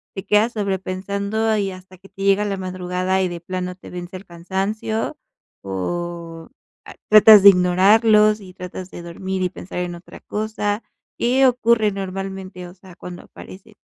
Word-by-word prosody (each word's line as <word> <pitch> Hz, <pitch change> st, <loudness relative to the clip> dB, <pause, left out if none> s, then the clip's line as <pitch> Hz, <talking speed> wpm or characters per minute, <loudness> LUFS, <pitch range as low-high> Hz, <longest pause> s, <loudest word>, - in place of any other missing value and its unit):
¿te 195 Hz, 0 st, -6 dB
quedas 210 Hz, +4 st, +2 dB
sobrepensando 200 Hz, +2 st, -2 dB
y 200 Hz, -2 st, -1 dB
hasta 185 Hz, 0 st, -13 dB
que 195 Hz, -, -17 dB
te 195 Hz, -, -8 dB
llega 200 Hz, +1 st, +3 dB
la 200 Hz, -1 st, -2 dB
madrugada, 185 Hz, 0 st, -2 dB
y 185 Hz, -, +1 dB
de 175 Hz, -1 st, -7 dB
plano 180 Hz, 0 st, -4 dB
te 185 Hz, -, -13 dB
vence 180 Hz, +1 st, -7 dB
el 195 Hz, -, -14 dB
cansancio? 195 Hz, +5 st, -3 dB, 0.4 s
O, 165 Hz, -, -5 dB, 0.4 s
ah, -, -, -11 dB, 0.2 s
¿tratas 215 Hz, -1 st, +9 dB
de 200 Hz, -, +11 dB
ignorarlos, 210 Hz, +4 st, +4 dB
y 185 Hz, -1 st, -12 dB
tratas 180 Hz, 0 st, -8 dB
de 175 Hz, -, -10 dB
dormir 190 Hz, +2 st, -4 dB
y 180 Hz, -, 0 dB
pensar 180 Hz, +1 st, -7 dB
en 175 Hz, -1 st, -3 dB
otra 170 Hz, -, -13 dB
cosa? 210 Hz, 0 st, -3 dB, 0.4 s
¿Qué 255 Hz, +3 st, +3 dB
ocurre 235 Hz, -4 st, +2 dB
normalmente? 190 Hz, -1 st, -6 dB
O 175 Hz, -, -13 dB
sea, 185 Hz, -1 st, -16 dB
cuando 180 Hz, 0 st, -9 dB
aparece. 205 Hz, +3 st, -14 dB
190 Hz, 165 wpm, -21 LUFS, 180-210 Hz, 0.4 s, de